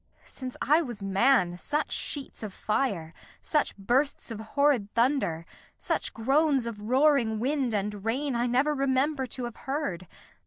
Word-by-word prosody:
Since 255 Hz, -2 st, -7 dB
I 305 Hz, +4 st, +4 dB
was 240 Hz, -9 st, -6 dB
man, 195 Hz, -2 st, +3 dB
Such 300 Hz, +8 st, -1 dB
sheets 285 Hz, -2 st, -4 dB
of 210 Hz, -4 st, -6 dB
fire, 200 Hz, -8 st, -1 dB, 0.3 s
such 300 Hz, -8 st, 0 dB
bursts 250 Hz, +6 st, 0 dB
of 220 Hz, -, -5 dB
horrid 230 Hz, -2 st, +1 dB
thunder, 230 Hz, -, +1 dB, 0.3 s
Such -, -, -1 dB
groans 270 Hz, +2 st, +2 dB
of 225 Hz, -3 st, -6 dB
roaring 250 Hz, -1 st, +3 dB
wind 260 Hz, -2 st, 0 dB
and 205 Hz, 0 st, -2 dB
rain, 265 Hz, +5 st, -1 dB
I 240 Hz, +1 st, +1 dB
never 265 Hz, +5 st, +2 dB
Remember 270 Hz, 0 st, +1 dB
to 250 Hz, +2 st, -6 dB
have 240 Hz, -2 st, -5 dB
heard. 265 Hz, -, -3 dB
250 Hz, 150 wpm, -28 LUFS, 210-280 Hz, 0.3 s, I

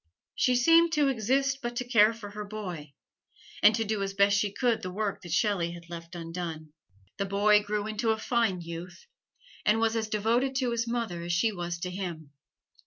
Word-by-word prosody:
She 250 Hz, -, +2 dB
seemed 330 Hz, +7 st, +5 dB
to 295 Hz, -3 st, +3 dB
exist 270 Hz, +3 st, +1 dB
but 240 Hz, -1 st, -4 dB
to 250 Hz, 0 st, -3 dB
care 225 Hz, -3 st, +5 dB
for 220 Hz, -3 st, -9 dB
her 210 Hz, 0 st, -6 dB
boy, 180 Hz, -9 st, -7 dB, 0.7 s
and 210 Hz, +1 st, +7 dB
to 225 Hz, -, 0 dB
do 215 Hz, -1 st, -1 dB
as 195 Hz, 0 st, -3 dB
best 200 Hz, 0 st, +4 dB
she 200 Hz, 0 st, +1 dB
could 240 Hz, +1 st, 0 dB
the 185 Hz, -, -4 dB
work 200 Hz, +1 st, -3 dB
that 175 Hz, -, -9 dB
Shelley 175 Hz, -2 st, +1 dB
had 170 Hz, 0 st, -12 dB
left 170 Hz, +1 st, -8 dB
undone. 165 Hz, -2 st, -6 dB, 0.4 s
The 200 Hz, -, -2 dB
boy 210 Hz, +2 st, +4 dB
grew 210 Hz, 0 st, -2 dB
into 215 Hz, +2 st, -2 dB
a 220 Hz, -, +2 dB
fine 220 Hz, -5 st, 0 dB
youth, 170 Hz, -, -8 dB, 0.6 s
and 215 Hz, +1 st, +3 dB
was 225 Hz, 0 st, +1 dB
as 220 Hz, -1 st, -1 dB
devoted 235 Hz, +5 st, +1 dB
to 255 Hz, -2 st, 0 dB
his 235 Hz, 0 st, -1 dB
mother 230 Hz, -8 st, -2 dB
as 170 Hz, 0 st, -2 dB
she 220 Hz, +7 st, +2 dB
was 175 Hz, -3 st, -4 dB
to 180 Hz, -1 st, -3 dB
him. 170 Hz, -6 st, -6 dB
210 Hz, 200 wpm, -28 LUFS, 175-230 Hz, 0.7 s, and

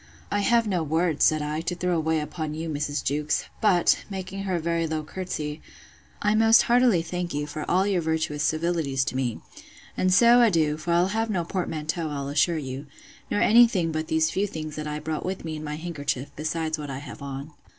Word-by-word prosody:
I 205 Hz, -, +1 dB
have 230 Hz, +3 st, +3 dB
no 185 Hz, -4 st, 0 dB
words, 160 Hz, 0 st, +1 dB
said 155 Hz, -1 st, +3 dB
I, 150 Hz, +1 st, -2 dB
to 175 Hz, +2 st, -3 dB
throw 180 Hz, 0 st, 0 dB
away 160 Hz, -1 st, +1 dB
upon 150 Hz, 0 st, -4 dB
you, 160 Hz, +1 st, -4 dB
Mrs. 145 Hz, -1 st, -2 dB
Jewkes; 150 Hz, +2 st, 0 dB, 0.2 s
but, 180 Hz, -6 st, +3 dB
making 195 Hz, 0 st, -5 dB
her 185 Hz, -2 st, 0 dB
a -, -, 0 dB
very 165 Hz, 0 st, 0 dB
low 155 Hz, -1 st, -2 dB
courtesy, 155 Hz, -3 st, -5 dB, 0.6 s
I 210 Hz, 0 st, +3 dB
most 225 Hz, +1 st, +6 dB
heartily 240 Hz, -8 st, +4 dB
thank 175 Hz, -1 st, -4 dB
you 145 Hz, 0 st, -1 dB
for 150 Hz, +1 st, -6 dB
all 185 Hz, +2 st, +3 dB
your 195 Hz, -3 st, +1 dB
virtuous 160 Hz, -2 st, -1 dB
civilities 155 Hz, -4 st, 0 dB
to -, -, -3 dB
me. 125 Hz, -4 st, -2 dB, 0.5 s
And 185 Hz, -, +1 dB
so 235 Hz, +5 st, +6 dB
adieu; 160 Hz, -9 st, +3 dB
for 170 Hz, +2 st, -3 dB
I'll 175 Hz, +2 st, +3 dB
have 225 Hz, +2 st, -1 dB
no 185 Hz, -5 st, 0 dB
portmanteau, 165 Hz, -2 st, -3 dB
I'll 140 Hz, -1 st, -4 dB
assure 155 Hz, +4 st, +2 dB
you, 135 Hz, 0 st, -6 dB, 0.4 s
nor 205 Hz, -, 0 dB
any 235 Hz, +2 st, +7 dB
thing 175 Hz, -7 st, -1 dB
but 155 Hz, 0 st, -3 dB
these 160 Hz, 0 st, +2 dB
few 200 Hz, +2 st, 0 dB
things 155 Hz, -4 st, -6 dB
that 155 Hz, 0 st, -4 dB
I 150 Hz, 0 st, -3 dB
brought 155 Hz, 0 st, -4 dB
with 185 Hz, -2 st, -4 dB
me 160 Hz, -1 st, -4 dB
in 155 Hz, -, -6 dB
my 150 Hz, 0 st, -4 dB
handkerchief, 145 Hz, -4 st, -4 dB
besides 155 Hz, +1 st, -2 dB
what 145 Hz, -1 st, -6 dB
I 135 Hz, -, -4 dB
have 140 Hz, +1 st, -9 dB
on. 140 Hz, +2 st, -6 dB
160 Hz, 215 wpm, -25 LUFS, 150-180 Hz, 0.6 s, any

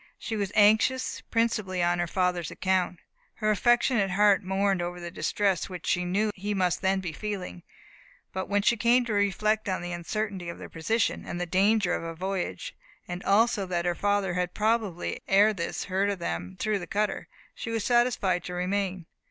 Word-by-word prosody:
She 225 Hz, -, -4 dB
was 200 Hz, -2 st, -2 dB
anxious, 220 Hz, +5 st, +3 dB
principally, 215 Hz, -6 st, 0 dB
on 175 Hz, 0 st, +2 dB
her 175 Hz, -, 0 dB
father's 180 Hz, -1 st, 0 dB
account. 185 Hz, -1 st, 0 dB, 0.4 s
Her 215 Hz, -1 st, +1 dB
affectionate 235 Hz, -1 st, +3 dB
heart 200 Hz, +1 st, +4 dB
mourned 190 Hz, 0 st, +1 dB
over 175 Hz, 0 st, -4 dB
the 175 Hz, -1 st, -6 dB
distress 195 Hz, 0 st, 0 dB
which 180 Hz, -2 st, -7 dB
she 180 Hz, 0 st, +1 dB
knew 205 Hz, +4 st, +1 dB
he 205 Hz, +2 st, -3 dB
must 180 Hz, -5 st, +1 dB
then 190 Hz, 0 st, +1 dB
be 175 Hz, -4 st, -5 dB
feeling; 185 Hz, -, -5 dB, 0.7 s
but 190 Hz, 0 st, -4 dB
when 205 Hz, 0 st, +1 dB
she 235 Hz, +3 st, +3 dB
came 240 Hz, +3 st, +3 dB
to 225 Hz, -, -2 dB
reflect 205 Hz, +1 st, +1 dB
on 185 Hz, -2 st, -2 dB
the 175 Hz, -, -4 dB
uncertainty 185 Hz, +1 st, -3 dB
of 170 Hz, -, -7 dB
their -, -, -9 dB
position, 210 Hz, +8 st, 0 dB
and 175 Hz, -, -5 dB
the 180 Hz, -, -1 dB
danger 195 Hz, +1 st, +2 dB
of -, -, -1 dB
a 165 Hz, 0 st, -6 dB
voyage, 185 Hz, -, -3 dB, 0.3 s
and 175 Hz, +1 st, -5 dB
also 205 Hz, -1 st, +3 dB
that 175 Hz, -1 st, -1 dB
her 175 Hz, -, +2 dB
father 200 Hz, 0 st, 0 dB
had 180 Hz, 0 st, -2 dB
probably 215 Hz, -5 st, 0 dB
ere 205 Hz, +3 st, +5 dB
this 170 Hz, -4 st, -3 dB
heard 195 Hz, +2 st, 0 dB
of 200 Hz, -, -1 dB
them 90 Hz, -, -4 dB
through 215 Hz, -2 st, 0 dB
the 175 Hz, -, -7 dB
cutter, 210 Hz, 0 st, -1 dB, 0.3 s
she -, -, -6 dB
was 225 Hz, -2 st, -1 dB
satisfied 240 Hz, -7 st, +2 dB
to 180 Hz, -, -5 dB
remain. 185 Hz, -1 st, -2 dB
195 Hz, 190 wpm, -27 LUFS, 180-210 Hz, 0.7 s, ere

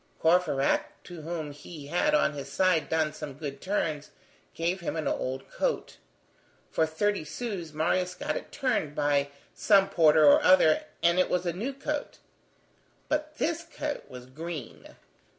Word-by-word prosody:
Courfeyrac, 165 Hz, -5 st, +1 dB
to 175 Hz, -3 st, -9 dB
whom 160 Hz, -2 st, -4 dB
he 145 Hz, +1 st, -10 dB
had, 235 Hz, -, +2 dB
on 300 Hz, -, +2 dB
his 140 Hz, -1 st, -7 dB
side, 180 Hz, -1 st, +2 dB
done 160 Hz, -1 st, +1 dB
some 145 Hz, -2 st, -7 dB
good 145 Hz, -2 st, -6 dB
turns, 160 Hz, -7 st, -2 dB, 0.5 s
gave 170 Hz, +3 st, -1 dB
him 170 Hz, -, -3 dB
an 160 Hz, -, -2 dB
old 130 Hz, +1 st, -2 dB
coat. -, -, -2 dB, 0.7 s
For 160 Hz, -, +2 dB
thirty 200 Hz, +4 st, 0 dB
sous, 190 Hz, -3 st, -5 dB
Marius 180 Hz, +4 st, 0 dB
got 300 Hz, +1 st, -3 dB
it -, -, -6 dB
turned 160 Hz, -, -1 dB
by 145 Hz, -1 st, +1 dB, 0.2 s
some 195 Hz, -2 st, +4 dB
porter 155 Hz, -2 st, +5 dB
or 145 Hz, -, +7 dB
other, 170 Hz, -4 st, +5 dB, 0.2 s
and 170 Hz, +1 st, +4 dB
it 185 Hz, -, +3 dB
was 180 Hz, 0 st, 0 dB
a 170 Hz, -, 0 dB
new 220 Hz, +10 st, -3 dB
coat. 290 Hz, +2 st, -4 dB, 0.9 s
But 305 Hz, 0 st, -2 dB
this 335 Hz, +1 st, 0 dB
coat 300 Hz, -3 st, -5 dB
was 125 Hz, -1 st, -10 dB
green. 150 Hz, 0 st, -8 dB
165 Hz, 155 wpm, -28 LUFS, 150-195 Hz, 0.9 s, or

